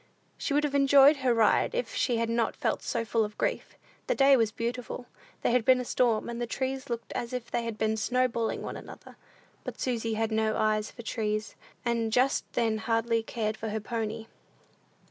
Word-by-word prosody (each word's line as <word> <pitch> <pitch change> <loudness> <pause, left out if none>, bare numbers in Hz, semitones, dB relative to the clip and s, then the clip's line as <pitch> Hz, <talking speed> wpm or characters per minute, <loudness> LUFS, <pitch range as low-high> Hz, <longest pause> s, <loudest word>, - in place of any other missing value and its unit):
She 285 - -2
would 295 - +3
have 290 -2 -1
enjoyed 280 +1 +6
her 260 -2 +1
ride 230 - +3
if - - -2
she 240 -3 +1
had 230 0 0
not 230 -1 0
felt - - -1
so 235 -3 -2
full 225 0 +1
of 210 0 -6
grief. - - -2 0.3
The - - +1
day 275 0 +6
was 225 -4 +2
beautiful. 240 +2 -4 0.4
There - - +2
had 250 -1 +3
been 255 +2 +5
a 250 - -3
storm, 235 -3 +1
and 235 0 -5
the 240 - -1
trees 265 +2 -3
looked 235 -1 -4
as 235 +1 -4
if 250 -2 -5
they 235 -1 -1
had 230 -2 -4
been 220 0 +1
snowballing 235 0 0
one - - -5
another; - - -12 0.5
but - - -7
Susy 230 -3 -1
had 220 0 -1
no 220 0 +1
eye 215 0 +2
for 235 +3 -9
trees, 215 -1 -2 0.3
and 230 -2 0
just 255 +4 +1
then 225 -2 +1
hardly 230 +1 +1
cared 220 -1 -3
for 220 0 -5
her 220 +1 -2
pony. 225 0 -4
230 Hz, 205 wpm, -28 LUFS, 220-250 Hz, 0.5 s, enjoyed